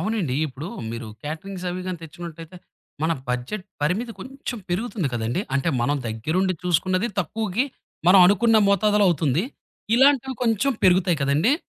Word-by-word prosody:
అవునండి. 190 - -1
ఇప్పుడు, 145 +4 -7 0.2
మీరు 115 0 -6 0.2
కేటరింగ్స్ 180 +5 -6
అవి 180 +1 -4
గానీ, 185 -2 -3
తెచ్చుకున్నటైతే? 165 +1 -9 0.5
మన 160 +1 +2 0.2
బడ్జెట్ 125 +11 -3 0.2
పరిమితి 205 +10 0
కొంచెం 260 -2 -6
పెరుగుతుంది 195 - -1
కదండీ! 120 +6 -1
అంటే 140 +4 +1
మనం 145 +4 +1
దగ్గరుండి 160 - 0
చూసుకున్నది 185 +4 +1
తక్కువుకి. 215 - -1 0.4
మనం 190 +2 +8
అనుకున్న 220 +4 +4
మోతాదులో 205 +1 +3
అవుతుంది. 155 -2 +1 0.5
ఇలాంటివి 265 0 +4
కొంచెం 235 +3 +2
పెరుగుతాయి 180 -1 +4
కదండి! 150 - +3
180 Hz, 135 wpm, -23 LUFS, 155-215 Hz, 0.5 s, మనం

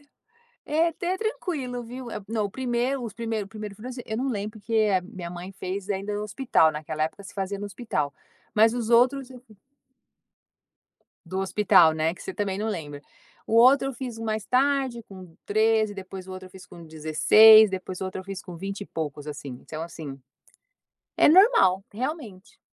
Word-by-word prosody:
Então - - -25 0.6
é 315 +3 +2
até 350 +3 -3
tranquilo 310 - -3
viu? 250 +2 -8 0.2
Não 220 -1 -1
o - - -4
primeiro 250 +3 -1
os 225 -4 -6
primeiro 225 -1 -3
o - - -13
1º 210 -1 -7
furo, 215 +5 -9
assim, 250 0 -7
eu 220 - -4
não 260 +3 -1
lembro, 215 -1 -4
porque 215 +3 -7 0.2
a - - 0
minha 180 -2 -8
mãe 175 +2 -8
fez 190 +1 -6
ainda 200 +1 -3
no 205 - -3
hospital, 210 - +2
naquela 155 0 -3
época 160 +6 -4
se 195 - -11
fazia 195 0 -3
no 205 - -4
hospital, 200 - -3 0.4
mas 220 +1 +5
os 235 -2 -3
outros 255 +3 +3
eu 250 - -11 1.9
Do 185 +3 -4
hospital, 190 -4 +4
né, 160 +1 0
que - - -14
você 190 - -6
também 195 -1 -2
não 215 +2 -2
lembra. 150 -8 -5 0.4
O - - -4
outro 260 +4 +6
eu 270 - -4
fiz 245 -2 -6
mais 220 -2 -3
tarde 265 -2 +1
com 185 -5 -13
13, 215 0 +2
depois 190 -1 -9
o - - -8
outro 185 0 -8
eu - - -21
fiz 190 -1 -13
com 170 -1 -13
16 160 +8 +7
depois 185 -1 -6
o - - -1
outro 185 0 -5
eu - - -9
fiz 195 -1 -6
com 175 -2 -10
20 195 +3 -5
e - - -5
poucos 150 -4 -5
assim, 140 -4 -7
então 155 0 -7
assim, 155 -5 -8 1.0
é - - +6
normal 330 - +5
realmente. 230 - -6
205 Hz, 195 wpm, -25 LUFS, 185-240 Hz, 1.9 s, 16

